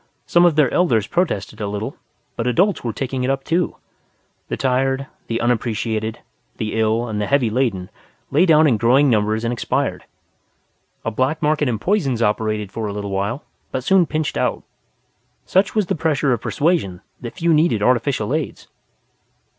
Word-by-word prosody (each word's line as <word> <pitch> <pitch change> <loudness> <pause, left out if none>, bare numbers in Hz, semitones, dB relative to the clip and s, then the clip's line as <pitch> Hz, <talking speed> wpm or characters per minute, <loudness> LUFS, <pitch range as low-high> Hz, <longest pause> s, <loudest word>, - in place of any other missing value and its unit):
Some 175 0 +4
of 170 -3 +4
their 150 -5 +3
elders 120 - +2
protested 110 - -2
a 105 - -1
little, 105 +2 -4 0.4
but 115 - -2
adults 185 - +2
were 120 - -1
taking 130 +1 -3
it 125 - 0
up 135 0 -1
too. 170 +2 0 0.7
The - - -3
tired, 135 +1 0 0.2
the 115 0 -1
unappreciated, 110 -2 -1 0.4
the 110 -1 -3
ill 110 +2 +1
and 105 -2 -3
the 105 - -1
heavy 135 -5 +2
laden 110 -7 -1 0.4
lay 170 +7 +4
down 155 -1 +6
in 130 -7 +3
growing 130 +5 +4
numbers 110 0 +1
and 115 +1 0
expired. 120 - -2 1.0
A 115 - 0
black 130 +8 0
market 150 -2 +2
in 115 - -1
poisons 135 - 0
operated 105 -1 -1
for 110 -2 -3
a 100 - -4
little 100 -1 -5
while, 100 +8 -2 0.3
but 130 - -3
soon 185 +2 +4
pinched 155 -1 -2
out. - - -1 0.8
Such 190 +3 +2
was 210 -2 +2
the - - -1
pressure 150 -4 +1
of 120 - -2
persuasion 145 - 0 0.2
that 120 -2 -8
few 170 0 +2
needed 150 -9 +2
artificial 125 -1 +1
aids. 155 -1 -3
125 Hz, 170 wpm, -20 LUFS, 110-150 Hz, 1.0 s, down